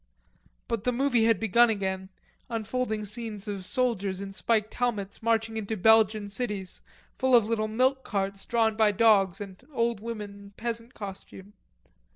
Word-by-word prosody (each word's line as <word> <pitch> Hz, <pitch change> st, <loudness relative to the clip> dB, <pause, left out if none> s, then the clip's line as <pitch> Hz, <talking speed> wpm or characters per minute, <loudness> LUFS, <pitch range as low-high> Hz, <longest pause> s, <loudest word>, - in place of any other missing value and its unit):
But 230 Hz, -3 st, -2 dB
the 250 Hz, -, +2 dB
movie 245 Hz, -2 st, +2 dB
had 225 Hz, -4 st, +3 dB
begun 235 Hz, +3 st, +4 dB
again, 190 Hz, -3 st, -2 dB, 0.4 s
unfolding 225 Hz, -1 st, -2 dB
scenes 215 Hz, -1 st, -6 dB
of 195 Hz, -3 st, -4 dB
soldiers 205 Hz, -7 st, 0 dB
in 195 Hz, 0 st, -6 dB
spiked 215 Hz, +1 st, 0 dB
helmets 215 Hz, -5 st, -2 dB
marching 225 Hz, 0 st, 0 dB
into 220 Hz, 0 st, -3 dB
Belgian 215 Hz, +1 st, +4 dB
cities 200 Hz, -3 st, -4 dB, 0.4 s
full 260 Hz, -1 st, +4 dB
of 230 Hz, -3 st, +6 dB
little 215 Hz, -1 st, 0 dB
milk 260 Hz, +4 st, +1 dB
carts 195 Hz, -1 st, -2 dB
drawn 225 Hz, -2 st, +2 dB
by 215 Hz, -1 st, +3 dB
dogs 195 Hz, -4 st, +4 dB
and 195 Hz, +1 st, -9 dB
old 235 Hz, -4 st, 0 dB
women 210 Hz, -2 st, -6 dB
in 200 Hz, 0 st, -13 dB
peasant 230 Hz, +1 st, -5 dB
costume. 195 Hz, 0 st, -9 dB
220 Hz, 155 wpm, -28 LUFS, 200-230 Hz, 0.4 s, of